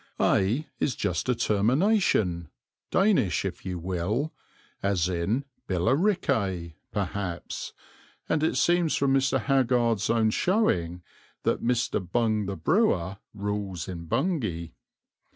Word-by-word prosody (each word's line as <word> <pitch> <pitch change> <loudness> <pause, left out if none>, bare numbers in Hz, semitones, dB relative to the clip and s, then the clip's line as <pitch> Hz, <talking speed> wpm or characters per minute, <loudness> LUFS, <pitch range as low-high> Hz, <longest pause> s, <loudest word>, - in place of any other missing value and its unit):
"Ay" 115 +11 +2
is 135 - 0
just 90 +6 -1
a 125 - +3
termination, 110 - +2 0.4
Danish 190 - +2
if - - -5
you 90 -1 -4
will, 95 - -2 0.5
as 95 -4 +1
in 95 +10 -1 0.2
Billericay, 95 - +1 0.2
perhaps, 95 -3 -4 0.6
and 150 - +1
it 160 - +1
seems 175 -2 +3
from 135 -1 +2
Mr. 135 0 +2
Haggard's 120 -3 +2
own 115 -1 +3
showing 90 - +1 0.4
that - - +1
"Mr. 120 0 +1
Bung 110 +2 0
the 100 - -4
Brewer" 95 - +1 0.2
rules 100 -4 -3
in 85 -3 -6
Bungay. 110 - -1
105 Hz, 115 wpm, -27 LUFS, 90-135 Hz, 0.6 s, a